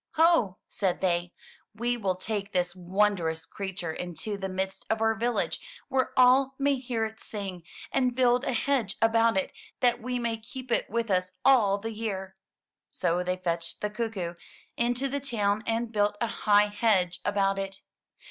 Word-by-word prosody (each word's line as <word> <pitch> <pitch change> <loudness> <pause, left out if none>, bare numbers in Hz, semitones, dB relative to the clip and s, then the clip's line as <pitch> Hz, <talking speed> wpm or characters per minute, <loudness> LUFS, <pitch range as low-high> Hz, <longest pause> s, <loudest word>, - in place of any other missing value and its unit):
*'Ho," 320 - +4
said 190 -3 -1
they, 175 -1 0 0.4
*Ve 240 +2 0
will 195 -6 -1
take 200 +1 -3
this 180 -1 0
wondrous 180 -3 0
creature 180 -2 -5
into 180 +5 -4
the 195 -1 -4
midst 190 +1 -3
of 220 - +1
our 225 0 +3
village 235 +2 -1 0.3
where 260 -1 +1
all 260 +2 +5
may 280 0 +2
hear 240 -3 -1
it 220 0 -7
sing, 195 -4 -6 0.3
and 255 -2 +1
build 250 0 +3
a 275 - 0
hedge 240 -5 0
about 225 -1 +4
it, 190 - 0 0.3
that 245 -1 +3
we 250 +2 -2
may 235 -2 -1
keep 245 +3 -9
it - - +2
with 230 -2 -1
us 185 0 +1
all 220 -7 +5
the 225 +3 -5
year." 195 -4 -4 0.5
So 175 0 0
they 180 0 -1
fetched 170 -2 -3
the 210 - -1
cuckoo 210 -6 -3 0.4
into 245 +3 0
the 280 +1 -2
town 215 -6 0
and 230 0 0
built 205 -1 +1
a - - +1 0.2
high 205 0 +7
hedge 200 -5 +2
about 195 -1 +1
it. 195 0 -5
210 Hz, 170 wpm, -28 LUFS, 190-240 Hz, 0.5 s, high